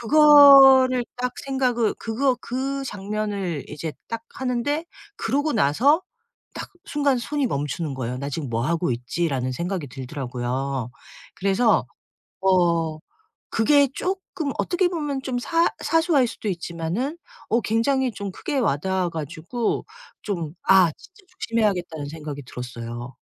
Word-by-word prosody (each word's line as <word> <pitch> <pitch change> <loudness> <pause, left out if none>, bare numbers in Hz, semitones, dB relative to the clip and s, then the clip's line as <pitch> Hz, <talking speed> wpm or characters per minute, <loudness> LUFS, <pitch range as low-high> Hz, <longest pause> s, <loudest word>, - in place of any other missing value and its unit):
그거를 270 -2 +8
딱 250 0 -2
생각을 255 -4 +1
그거 250 +3 0
그 270 +2 -3
장면을 205 - -3
이제 150 +1 -5 0.2
딱 230 -1 -4
하는데 265 +5 -1 0.3
그러고 295 - 0
나서 235 - +3 0.5
딱 - - -7 0.2
순간 285 -3 +1
손이 285 +3 -1
멈추는 145 - -3
거예요. 125 -1 -4
'나 140 +1 -4
지금 145 -1 -4
뭐 115 0 -1
하고 170 -1 0
있지?'라는 130 +2 -2
생각이 170 +2 -3
들더라고요. 130 -1 -4 0.4
그래서 200 +4 +2 0.6
어 170 -4 +2 0.5
그게 280 +5 +4
쪼끔 365 -5 -3
어떻게 355 0 +1
보면 295 -6 -3
좀 255 -2 -2
사 330 +7 +2
사소할 325 -5 +3
수도 225 - -6
있지만은 175 - -3 0.3
어 230 - +2
굉장히 250 +5 +1
좀 200 -1 -5
크게 290 - -3
와 225 - +2
닿아 190 +2 -1
가지고 165 - -3 0.4
좀 170 -7 -3
'아 190 -3 +6
진짜 390 +2 -18 0.2
조심해야겠다.'는 185 -9 -1
생각이 150 -2 -7
들었어요. 120 0 -7
210 Hz, 280 characters per minute, -23 LUFS, -, 0.6 s, 그거를